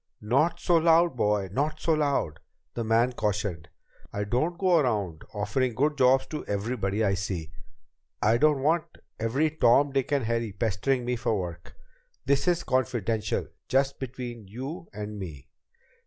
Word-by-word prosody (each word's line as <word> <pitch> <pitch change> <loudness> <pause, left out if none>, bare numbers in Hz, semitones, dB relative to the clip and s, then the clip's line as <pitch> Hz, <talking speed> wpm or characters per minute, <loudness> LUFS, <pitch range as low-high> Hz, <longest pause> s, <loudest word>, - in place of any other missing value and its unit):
"Not 135 +10 +1
so 175 - +3
loud, 165 -1 +4
boy! 105 -4 +1
Not 150 +7 -1
so 165 - +2
loud!" 140 - 0 0.3
the 115 - -3
man 115 +3 +2
cautioned. 100 -7 -2 0.4
"I 105 - -2
don't 140 +12 0
go 180 -3 +4
around 105 - -1
offering 110 +4 -1
good 150 +4 +1
jobs 130 0 +4
to 155 - -4
everybody 105 0 -1
I 100 -2 +2
see. 90 -5 -3 0.7
I 110 +2 +3
don't 150 -3 +3
want 160 +2 +2 0.3
every 135 +8 +1
Tom, 140 -1 +4
Dick, 135 0 -1
and 140 -5 +1
Harry 115 -2 -1
pestering 115 +5 0
me 125 0 -1
for 110 -2 0
work. 85 -1 -7 0.5
This 140 +2 +2
is 175 -1 +2
confidential. 115 -5 -1 0.2
Just 135 +2 +1
between 120 -4 -6
you 135 - -7
and 105 0 -6
me." 80 -8 -8
120 Hz, 155 wpm, -27 LUFS, 105-140 Hz, 0.7 s, loud